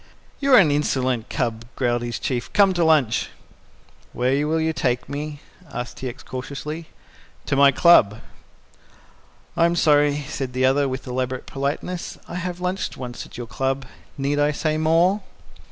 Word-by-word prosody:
"You 275 -2 +5
are - - +9
an 170 -7 +6
insolent 130 -5 0
cub," 115 -5 -2
growled 120 -2 0
his 120 -2 -3
Chief. 120 -3 -3
"Come 200 -2 +5
to 175 -1 +1
lunch." 150 -8 +3 0.8
"Where 135 +4 +1
will 160 +1 +1
you 160 0 0
take 125 -5 -1
me?" 145 +1 -5 0.3
asked 120 0 -6
T. 130 - -4
X. 120 - -11
cautiously. 145 +5 -6 0.6
"To - - 0
my 140 0 +6
club." 130 - +5 1.4
"I'm 170 +1 +3
sorry," 145 -2 +3
said 130 -2 -4
the 130 0 +2
other, 135 +1 +3
with 130 +1 -5
elaborate 130 0 -3
politeness, 145 +6 -4
"I 170 - -5
have 180 0 -4
lunched 180 +1 -3
once 125 -2 -7
at - - -12
your 120 - -5
club. 135 +2 -2 0.3
Need 140 +1 0
I 145 +1 +2
say 155 +1 -1
more?" 165 +6 +3
140 Hz, 160 wpm, -23 LUFS, 130-160 Hz, 1.4 s, are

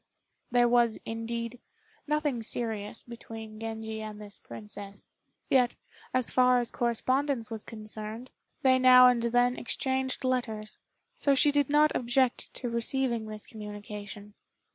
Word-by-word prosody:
There 245 0 +4
was, 235 -2 +3
indeed, 230 +1 -4 0.5
nothing 295 -5 0
serious 220 -2 -3
between 225 -2 -9
Genji 220 -1 -5
and 215 -1 -7
this 205 -1 -6
princess; 205 -2 -9 0.4
yet, 250 -2 +3 0.4
as 255 -2 +1
far 250 -1 +5
as 240 -1 -3
correspondence 250 +1 0
was 220 -2 -5
concerned, 215 +2 -7 0.3
they 260 -1 +5
now 255 0 +9
and 245 -1 +2
then 245 +1 +2
exchanged 260 +2 -1
letters, 225 -5 -2 0.3
so 280 -1 +2
she 290 +2 +5
did 285 -1 +2
not 300 +1 +5
object 250 +1 +1
to 250 - -2
receiving 235 -1 -1
this 215 -1 -6
communication. 210 -1 -8
235 Hz, 130 wpm, -29 LUFS, 220-255 Hz, 0.5 s, now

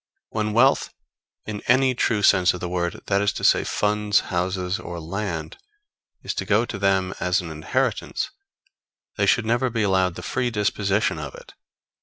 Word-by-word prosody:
When 105 -1 -2
wealth, 130 +5 +3 0.5
in 105 -1 -5
any 130 +1 +4
true 110 -3 0
sense 90 -3 +5
of - - -7
the 90 - -4
word, 85 -1 -2
that 100 0 +1
is 100 - +2
to - - -6
say, - - +4
funds, 105 0 +1
houses 90 +2 -1
or 85 -5 -7
land, 100 - -4 0.7
is - - -3
to - - -3
go 110 +3 +3
to 105 - -6
them 95 -2 +1
as 90 +1 +1
an 85 -2 -6
inheritance 130 - -2 0.9
they - - +2
should 120 - +3
never 120 +3 +1
be 115 -2 -1
allowed 95 -3 +2
the - - -8
free 125 - -1
disposition 105 -4 0
of 75 -3 -7
it. - - -13
100 Hz, 175 wpm, -23 LUFS, 90-110 Hz, 0.9 s, sense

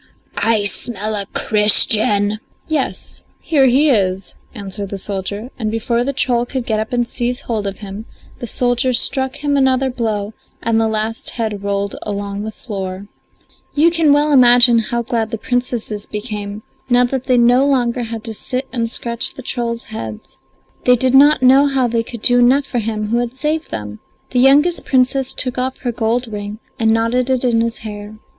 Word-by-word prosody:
I 225 -2 +1
smell 210 +1 -2
a 200 -2 -4
Christian." 210 -1 +3 0.3
"Yes, 305 -4 -3 0.2
here 280 -5 +2
he 280 +4 +4
is," 190 -4 0 0.2
answered 200 -1 -5
the 200 - -5
soldier, 200 +4 -4
and 220 -2 -1
before 235 +2 -1
the 275 - -1
troll 245 -3 +1
could 250 0 -4
get 220 -2 0
up 220 - -4
and 240 -1 0
seize 245 +1 -3
hold 215 -4 -3
of 195 - -4
him 205 +2 -8 0.3
the 240 - -5
soldier 245 +3 +1
struck 265 +2 +1
him 290 -1 +1
another 265 -1 +2
blow 220 -4 -3 0.3
and 225 0 +2
the 225 - +2
last 220 +1 -2
head 215 -4 -3
rolled 200 0 -2
along 200 -1 -4
the 220 +1 -5
floor. 195 -3 -7 0.7
You 320 +4 +4
can 330 -3 +3
well 295 +1 +3
imagine 245 -3 +6
how 235 +1 -2
glad 230 -2 -2
the 225 - -4
Princesses 235 -3 -3
became 210 -1 -5 0.3
now 245 0 +5
that 255 +1 -2
they 255 -2 +2
no 245 +2 +4
longer 250 -3 +1
had 225 -1 -5
to 225 -2 -3
sit 255 +5 -4
and 230 -2 -1
scratch 235 +1 0
the 265 - -9
trolls' 235 -2 -3
heads; 110 - -7 0.5
they 250 - +6
did 255 +1 +3
not 280 0 +6
know 270 +3 +6
how 265 -3 +1
they 230 -1 0
could 230 -1 -9
do 245 0 +4
enough 260 +4 +4
for 245 - -2
him 215 -1 -3
who 235 - +1
had 240 +1 -3
saved 305 +3 -2
them. 105 -1 -6 0.3
The 250 - +1
youngest 290 +7 +4
Princess 260 0 +1
took 255 -1 -1
off 260 +1 -2
her 245 - -1
gold 235 +2 -1
ring 210 -1 -6 0.2
and 225 -1 +2
knotted 230 +3 +1
it 260 -1 +1
in 235 -2 +2
his 230 0 -2
hair. 210 0 -8
235 Hz, 185 wpm, -17 LUFS, 210-255 Hz, 0.7 s, imagine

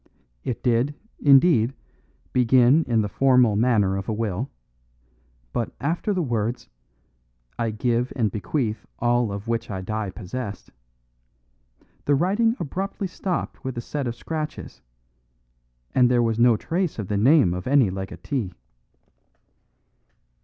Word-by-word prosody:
It 120 - -4
did, 125 +4 +1 0.2
indeed, 135 -4 +5 0.6
begin 125 +5 +4
in 115 -2 +2
the - - -1
formal 125 -1 +4
manner 105 -4 +2
of 95 - -5
a - - 0
will, 110 +2 -2 1.0
but 115 - -2
after 170 +9 -1
the 185 -3 0
words 120 -2 -2 0.9
"I 115 -1 0
give 120 +3 0
and 110 -6 +1
bequeath 110 +1 -2
all 120 -2 +1
of 100 +2 -6
which 115 0 -2
I 95 -3 -4
die 110 +1 -3
possessed" 105 +3 -7 1.3
the 145 - +3
writing 205 - +2
abruptly 195 +6 -3
stopped 180 0 -4
with 130 -2 -4
a - - -2
set 140 +2 -4
of 120 - -3
scratches, 155 +4 -6 1.1
and 125 -1 +4
there 120 -1 +3
was 115 -1 0
no 120 -2 +5
trace 175 - -2
of 105 -4 -4
the 105 - -1
name 120 - +5
of 90 +3 -5
any 130 -7 +4
legatee. 95 +2 -4
120 Hz, 130 wpm, -24 LUFS, 110-140 Hz, 1.3 s, indeed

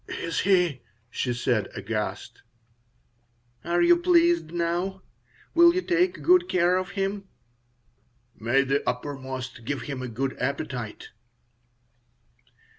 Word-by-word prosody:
"Is 165 - -3
he?" 180 -8 +2 0.3
she 125 - -2
said, 120 -4 0
aghast 105 0 -4 1.2
"Are 170 - +1
you 345 0 +6
pleased 345 - +3
now? 175 +3 -2 0.5
Will 340 +1 +6
you 370 - 0
take 360 +1 +1
good 360 0 +4
care 180 0 +3
of 185 +1 -1
him?" 195 0 -2 1.1
"May 120 +5 +1
the 135 +1 0
Uppermost 130 -1 -5
give 130 +1 -3
him 130 +1 -5
a 130 - -4
good 130 +3 -3
appetite." 125 -4 -4
165 Hz, 115 wpm, -26 LUFS, 130-195 Hz, 1.2 s, you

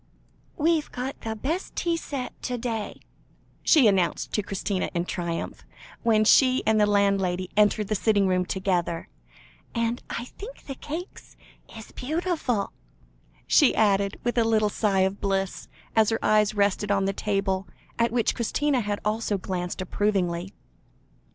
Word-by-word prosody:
"We've 315 0 +1
got 260 +3 -5
the 220 0 -3
best 310 - -3
tea 340 -2 0
set 275 -6 -5
to 250 -1 -2
day," 225 -3 -4 0.6
she 300 -7 +5
announced 190 -5 +2
to 210 - +1
Christina 195 -1 -2
in 170 0 0
triumph, 170 -2 -4 0.4
when 220 -2 +3
she 255 +3 +5
and 220 -1 +3
the 210 - +4
landlady 195 -3 +1
entered 210 0 +3
the 215 - 0
sitting 205 -1 +2
room 185 -1 +2
together, 180 -3 -1 0.7
"and 230 +1 0
I 235 - -4
think 435 - -11
the 275 - -5
cakes 320 +7 -8 0.4
is 220 - -10
beautiful," 300 - -2 0.7
she 290 - +5
added, 200 -2 +2
with 240 0 +1
a - - +4
little 220 -2 +2
sigh 200 -2 +1
of 190 +1 0
bliss, 195 -1 -1 0.3
as 220 -1 +5
her 225 - +1
eyes 215 0 +3
rested 200 0 +1
on 195 -1 +2
the 195 - 0
table, 195 -2 -1 0.3
at 235 0 +3
which 235 -1 +1
Christina 270 +3 0
had 205 -1 -2
also 215 -1 0
glanced 180 -1 -4
approvingly. 185 -2 -1
210 Hz, 150 wpm, -26 LUFS, 195-240 Hz, 0.7 s, she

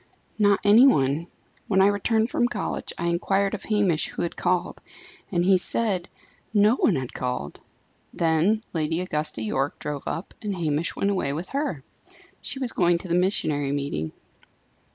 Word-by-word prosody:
"Not 205 -1 +4
any 215 +6 +7
one. 145 - +2 0.4
When 190 -2 +2
I 190 - +6
returned 220 +3 +1
from 240 - +2
college - - -3
I 170 - -3
inquired 195 +4 +1
of 215 - -5
Hamish 200 -7 +1
who - - -4
had 170 - -3
called, 180 -1 -1 0.5
and 175 -2 +1
he 190 -1 +5
said 190 -3 -1 0.5
no 210 +2 +5
one 195 - +3
had 130 -2 -4
called. 125 - -4 0.5
Then 170 +7 +1
Lady 160 0 -1
Augusta 150 -9 -2
Yorke 135 +6 -1
drove 145 -2 -5
up, 170 - -4
and 205 -3 -3
Hamish 155 -1 -1
went 200 - 0
away 140 -8 -1
with 165 +5 -5
her. 275 - -2 0.6
She - - -6
was 260 -3 -2
going 175 -1 +3
to 180 +1 -8
the - - 0
missionary 155 -6 +1
meeting." 140 - -2
175 Hz, 165 wpm, -25 LUFS, 150-205 Hz, 0.6 s, any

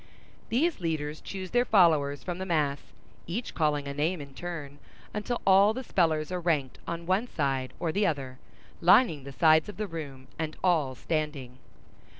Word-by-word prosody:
These 305 +6 +1
leaders 155 -3 -3
choose 190 -2 -6
their 245 0 +4
followers 160 - +3
from 175 -1 -4
the 190 - -3
mass, 150 -5 +1 0.5
each 215 +9 -4
calling 150 -3 0
a 140 - -3
name 155 +5 0
in 140 -2 -9
turn, 150 -5 -7 0.3
until 225 +3 -2
all 195 +3 +6
the 260 - -4
spellers 160 -7 +1
are 180 - -1
ranked 155 -7 -1
on 170 0 -4
one 190 +7 +1
side 135 - -1
or 165 - -1
the 200 +3 +2
other, 135 -4 -3 0.4
lining 170 - +5
the 140 - -7
sides 160 +5 +4
of 210 - -9
the 215 - -2
room, 145 -7 -7
and 155 -1 -3
all 155 -8 +2
standing. 145 -4 -3
160 Hz, 170 wpm, -28 LUFS, 145-185 Hz, 0.5 s, all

